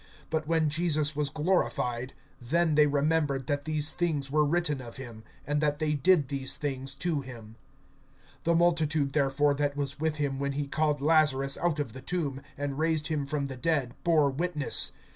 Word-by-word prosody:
But 155 -1 -1
when 160 -1 +2
Jesus 155 -1 +1
was 145 -1 +1
glorified, 135 -6 -1 0.3
then 160 +6 +1
they 150 0 +5
remembered 145 -2 +1
that 145 +1 -2
these 155 -1 0
things 150 -6 -1
were 150 +1 +3
written 150 -2 0
of 120 -2 -9
him, 120 -4 -9 0.2
and 145 0 0
that 150 -1 +1
they 155 -1 0
did 150 0 +3
these 135 -1 -1
things 135 -2 -4
to 160 0 -1
him. 115 -4 -11 0.9
(17)The 170 0 +3
multitude 160 -5 +2
therefore 145 0 +2
that 145 0 -1
was 145 0 -3
with 160 0 0
him 140 -2 -2
when 140 0 -1
he 145 +1 -2
called 150 0 0
Lazarus 145 -3 +3
out 170 -3 0
of 140 -7 -3
the 130 - -8
tomb, 140 -3 -3 0.2
and 140 0 -3
raised 160 -1 +1
him 145 -3 -1
from 145 -1 -1
the 135 -1 -6
dead, 140 -4 0
bore 155 -5 +3
witness. 155 0 +1
145 Hz, 180 wpm, -28 LUFS, 135-155 Hz, 0.9 s, they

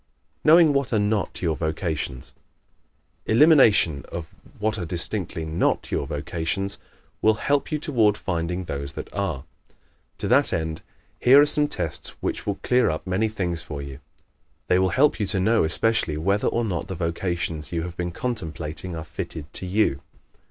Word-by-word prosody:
Knowing 160 -1 +7
What 140 -3 0
are 110 - +2
Not 105 -2 -1
Your 80 -3 +1
Vocations 80 -5 -3 0.9
¶ - - -1
Elimination 110 - +5
of 85 -2 -6 0.2
what 110 +1 -1
are - - -3
distinctly 85 0 -2
NOT 80 +1 0
your 70 - -1
vocations 85 +7 -3 0.4
will 110 0 +4
help 140 +7 0
you 155 - +1
toward 115 -9 +2
finding 90 -1 -2
those 70 -4 -5
that - - -8
ARE. 95 -9 -2 0.7
To - - -3
that - - +3
end 80 -1 -2 0.4
here 130 +3 +7
are 145 - +7
some 150 0 +1
tests - - -5
which - - -3
will 100 - 0
clear 125 -5 +3
up 80 +2 -3
many 95 +4 +1
things 90 -6 -3
for 75 - -7
you. 70 -1 -7 0.7
They 90 - +3
will 95 0 +3
help 140 +4 +3
you 105 - 0
to 95 0 +2
know 110 +5 +3
especially 85 -1 +1
whether 100 +6 +1
or 120 0 0
not 90 -5 -3
the 95 - -5
vocations 85 -3 -3
you 85 -1 -1
have 85 0 -6
been 90 -1 -2
contemplating 85 -6 -4
are 80 - -5
fitted 75 -1 -7
to 95 - -5
you. 90 -8 +1
90 Hz, 170 wpm, -24 LUFS, 80-110 Hz, 0.9 s, Knowing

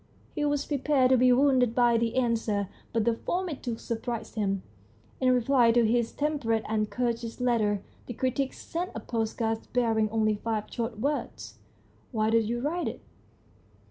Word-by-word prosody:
He 295 - -2
was 290 -1 0
prepared 275 -2 +2
to 260 - +6
be 250 +1 +5
wounded 255 -2 +3
by 240 -1 +4
the 230 0 -1
answer, 225 -5 0 0.2
but 225 -2 0
the 235 - +3
form 360 +10 -2
it 290 - -6
took 235 -3 -4
surprised 235 0 -4
him. 195 -3 -1 0.6
In 255 -1 +3
reply 245 -1 +4
to 240 -1 +4
his 230 +1 +1
tem 300 0 -1
perate 225 -3 0
and 215 -1 0
courteous 235 -1 -2
letter 215 -5 +1 0.2
the 240 - -4
critic 260 +2 0
sent 350 +3 -4
a - - -3
postcard 225 -1 -2
bearing 225 -3 +2
only 215 0 +2
five 215 0 -2
short 230 -2 -3
words 285 +5 -3 0.5
"Why 220 -2 +1
did 225 -1 +3
you 240 0 -1
write 335 +6 -1
it?" - - -5
235 Hz, 175 wpm, -28 LUFS, 225-260 Hz, 0.6 s, to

